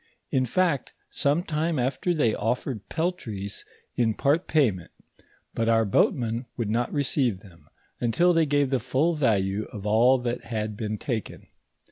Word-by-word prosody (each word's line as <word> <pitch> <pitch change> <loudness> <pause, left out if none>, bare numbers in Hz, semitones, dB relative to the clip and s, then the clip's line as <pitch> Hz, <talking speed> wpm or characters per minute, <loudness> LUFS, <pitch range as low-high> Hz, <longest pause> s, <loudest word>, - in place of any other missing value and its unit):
In 130 -1 +2
fact, 165 0 0 0.2
some 145 +5 +1
time 160 -2 -1
after 130 +7 0
they 145 -10 +2
offered 120 -1 -2
peltries 115 - -3 0.3
in 115 -3 +1
part 150 +5 +1
payment; 110 - +1 0.6
but 115 0 0
our 115 -1 +4
boatmen 115 +4 +1
would 115 -4 -1
not 120 +2 0
receive 130 -8 0
them, 90 -5 -18 0.3
until 170 +10 +3
they 165 -2 +3
gave 145 -1 +1
the 135 - +2
full 130 +8 +1
value 105 -8 +1
of 105 -2 -9
all 115 +5 +5
that 125 -1 -3
had 110 -2 -3
been 110 0 -3
taken. 115 -5 -4
125 Hz, 150 wpm, -26 LUFS, 110-145 Hz, 0.6 s, all